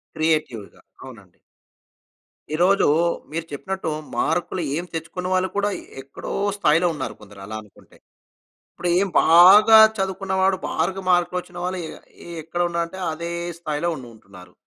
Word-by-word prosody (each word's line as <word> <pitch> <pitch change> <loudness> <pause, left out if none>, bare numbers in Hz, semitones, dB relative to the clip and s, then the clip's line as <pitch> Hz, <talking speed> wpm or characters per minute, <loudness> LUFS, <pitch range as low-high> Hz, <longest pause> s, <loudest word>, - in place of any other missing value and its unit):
క్రియేటివ్‌గా 155 -10 -2 0.2
అవునండి. 105 -9 -14 1.2
ఈరోజు 180 +5 +3 0.5
మీరు 165 +1 -4
చెప్పినట్టు 190 +5 -4 0.3
మార్కులు 175 +2 -1 0.2
ఏం 170 - -3
తెచ్చుకున్న 165 +3 -5
వాళ్ళు 185 0 +1
కూడా, 205 0 +1 0.3
ఎక్కడో 135 +1 -9 0.3
స్థాయిలో 165 -3 +3
ఉన్నారు 130 -7 -5
కొందరు 100 -1 -14
అలా 110 +1 -6
అనుకుంటే. 105 - -21 0.8
ఇప్పుడు 175 - -4
ఏం 200 +1 +1
బాగా 195 +7 +8 0.2
చదువుకున్నవాడు 190 0 0
బాగా 190 +4 -2
మార్కులు 180 0 +2
వచ్చిన 180 0 -16
వాళ్ళు 185 +1 -3
ఎ - - -7 0.4
ఎ - - -11
ఎక్కడ 165 +3 -5
ఉన్నారంటే 170 +1 -3
అదే 170 +2 -5 0.3
స్థాయిలో 165 0 -2
ఉండుంటున్నారు. 100 -8 -14
170 Hz, 125 wpm, -22 LUFS, 145-185 Hz, 1.2 s, బాగా